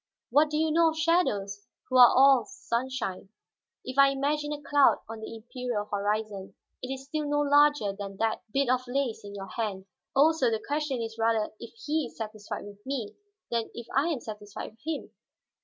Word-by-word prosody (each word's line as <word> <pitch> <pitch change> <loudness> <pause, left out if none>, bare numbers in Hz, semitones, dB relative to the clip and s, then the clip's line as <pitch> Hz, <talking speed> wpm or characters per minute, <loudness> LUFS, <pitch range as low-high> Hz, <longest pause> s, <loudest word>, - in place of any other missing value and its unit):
"What 300 +1 +5
do 300 - -1
you 315 0 +2
know 330 +1 +5
of 320 - -5
shadows, 205 - +1 0.2
who 255 - +1
are 245 - +11
all 270 -1 +6
sunshine? 260 - -3 0.6
If 260 +2 -3
I 275 0 +8
imagine 295 +2 -1
a 295 - -3
cloud 285 -1 +4
on 225 0 -7
the 220 +1 -7
imperial 235 -1 -4
horizon, 205 -1 -2 0.3
it 255 - -5
is 270 0 -6
still 300 +1 -3
no 290 0 +2
larger 290 -7 +4
than 195 -1 -7
that 225 +1 0
bit 275 +2 +1
of 255 0 +1
lace 245 -4 -1
in 205 0 -9
your 195 -1 -7
hand. 195 -2 -3 0.3
Also, 285 -2 +4
the 220 -1 -2
question 290 -4 -1
is 225 0 -7
rather 225 -1 +1
if - - -10
he 300 -2 0
is - - -17
satisfied 215 -2 -6
with 205 0 -12
me, 260 -6 -4 0.4
than 230 -1 -1
if 235 - -7
I 275 +4 +3
am 305 -8 -1
satisfied 210 -2 -7
with 220 - -28
him. 315 0 -4
250 Hz, 190 wpm, -28 LUFS, 215-290 Hz, 0.6 s, are